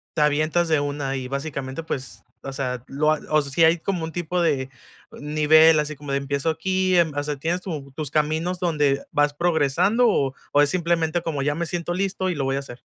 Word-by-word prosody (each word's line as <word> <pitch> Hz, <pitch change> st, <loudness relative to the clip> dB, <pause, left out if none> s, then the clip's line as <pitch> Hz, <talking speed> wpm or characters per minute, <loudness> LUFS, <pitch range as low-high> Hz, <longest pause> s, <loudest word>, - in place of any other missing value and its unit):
te 155 Hz, -, +1 dB
avientas 155 Hz, +3 st, +2 dB
de 155 Hz, -2 st, +3 dB
una 145 Hz, -1 st, -2 dB
y 130 Hz, -1 st, -5 dB
básicamente 140 Hz, +1 st, -4 dB
pues, 135 Hz, -4 st, -6 dB, 0.2 s
o 135 Hz, -, -7 dB
sea, 125 Hz, -2 st, -3 dB
lo 150 Hz, +3 st, 0 dB
o 155 Hz, 0 st, +1 dB
si 140 Hz, +3 st, +2 dB
hay 165 Hz, +2 st, +4 dB
como 175 Hz, -1 st, -2 dB
un 160 Hz, -, -8 dB
tipo 175 Hz, +1 st, -2 dB
de 140 Hz, -6 st, 0 dB, 0.4 s
nivel 155 Hz, +2 st, +4 dB
así 150 Hz, 0 st, -5 dB
como 145 Hz, -1 st, -6 dB
de -, -, +2 dB
empiezo 140 Hz, +3 st, -1 dB
aquí, 185 Hz, +3 st, 0 dB
em, 170 Hz, -2 st, +3 dB
o 145 Hz, -, -1 dB
sea, 150 Hz, 0 st, -3 dB
tienes 165 Hz, +6 st, -2 dB
tu 150 Hz, -7 st, -6 dB
tus 150 Hz, +1 st, -5 dB
caminos 160 Hz, +5 st, 0 dB
donde 145 Hz, -5 st, +1 dB
vas 145 Hz, 0 st, +2 dB
progresando, 175 Hz, -, +2 dB
o 140 Hz, -, +1 dB, 0.2 s
o 145 Hz, -, +5 dB
es 145 Hz, -, +4 dB
simplemente 170 Hz, -1 st, 0 dB
como 160 Hz, -4 st, -3 dB
ya 145 Hz, +1 st, 0 dB
me 170 Hz, +2 st, -2 dB
siento 175 Hz, +1 st, -3 dB
listo 190 Hz, 0 st, -1 dB
y 180 Hz, -, -2 dB
lo 140 Hz, -2 st, -2 dB
voy 135 Hz, 0 st, 0 dB
a -, -, -1 dB
hacer? 130 Hz, -3 st, -10 dB
155 Hz, 220 wpm, -23 LUFS, 140-170 Hz, 0.4 s, o